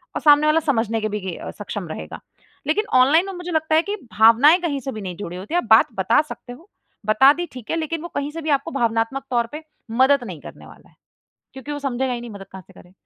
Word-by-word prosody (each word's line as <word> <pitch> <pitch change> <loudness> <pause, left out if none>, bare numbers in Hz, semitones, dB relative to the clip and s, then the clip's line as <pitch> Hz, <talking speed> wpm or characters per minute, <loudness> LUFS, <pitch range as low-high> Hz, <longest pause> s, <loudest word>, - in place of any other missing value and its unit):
और - - -2
सामने 295 0 +6
वाला 310 +1 +4
समझने 225 -7 -1
के 215 - -1
भी 210 0 -3
गे 185 -3 -5 0.2
सक्षम 205 -3 -6
रहेगा। 80 - -7 0.5
लेकिन 420 +8 +1
ऑनलाइन 310 +8 +4
में 390 - -6
मुझे 355 0 -7
लगता 315 0 +1
है 320 - +5
कि 405 +4 -4 0.2
भावनाएँ 250 +10 +6
कहीं 290 -5 -2
से 270 +1 -5
भी 215 - -7
नहीं 180 -2 -6
जुड़े 180 -3 -6
होते 195 - -8
है। - - +3
आप - - -12
बात 220 - +7
बता 190 +9 +3
सकते 260 -5 -10
हो। 335 +11 -17 0.4
बता 265 +6 +6
दी 350 +2 -4
ठीक 250 -4 -11
है - - 0
लेकिन 320 0 -3
वो 345 - -6
कहीं 285 +1 -2
से 330 +1 -7
भी 310 - -4
आपको 325 +4 -9
भावनात्मक 235 +1 -1
तौर 235 -2 0
पे 305 +1 -8 0.4
मदद 275 -1 +4
नहीं 180 -9 -8
करने - - -12
वाला - - -17
है, - - -29 0.6
क्योंकि 265 +2 -8
वो 290 - -4
समझेगा 265 -2 -2
ही 240 - -4
नहीं 240 -1 -8
मदद 195 -2 -10
कहाँ 190 -1 -9
से - - -18
करें? 180 - -19
265 Hz, 255 wpm, -21 LUFS, 220-310 Hz, 0.6 s, बात